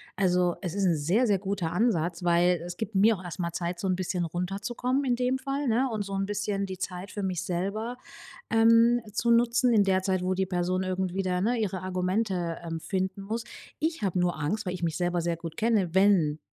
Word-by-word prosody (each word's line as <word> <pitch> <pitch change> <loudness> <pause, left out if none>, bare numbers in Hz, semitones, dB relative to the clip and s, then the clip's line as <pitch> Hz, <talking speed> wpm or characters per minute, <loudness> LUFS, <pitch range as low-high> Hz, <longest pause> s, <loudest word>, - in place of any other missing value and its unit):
Also, 180 -2 +2
es 180 -4 -4
ist 200 -1 0
'n 170 -3 +3
sehr, 185 +12 +2
sehr 205 - +3
guter 190 -4 -2
Ansatz, 175 -6 0
weil 175 0 +3
es 175 0 -7
gibt 220 -1 -5
mir 215 +3 +5
auch 185 - -11
erst 175 +1 -7
mal 170 -1 -1
Zeit, 175 0 -3
so 190 - -2
'n 185 - +2
bisschen 180 -1 -2
runterzukommen 200 - -2
in 245 -2 +2
dem 250 +1 0
Fall, 275 +1 -3
ne, 240 +4 +2
und 215 -2 -2
so 200 0 -7
'n 195 0 0
bisschen 205 -1 -2
die 190 -1 -7
Zeit 185 +2 -5
für 205 - -5
mich 185 -1 -2
selber, 200 +8 -3 0.5
ähm, 230 +1 +5
zu 235 +2 0
nutzen 240 +1 +3
in 210 -2 +5
der 190 -1 +2
Zeit, 185 -1 0
wo 185 +1 +1
die 190 0 -1
Person 180 0 0
irgendwie 185 0 -1
da, 180 -1 0
ne, 235 +5 +1
ihre 190 -4 -2
Argumente, 185 -2 -1
ähm, 165 -1 -4
finden 190 +2 -2
muss. 225 +4 -3 0.4
Ich 320 -2 -1
habe 185 -3 0
nur 175 0 +1
Angst, 190 +9 -1
weil 180 - -2
ich 180 -2 -6
mich 165 -1 -1
selber 175 -1 0
sehr 170 0 -1
gut 165 -1 -8
kenne, 210 -7 +1
wenn 190 -6 +4
190 Hz, 225 wpm, -28 LUFS, 175-220 Hz, 0.5 s, mir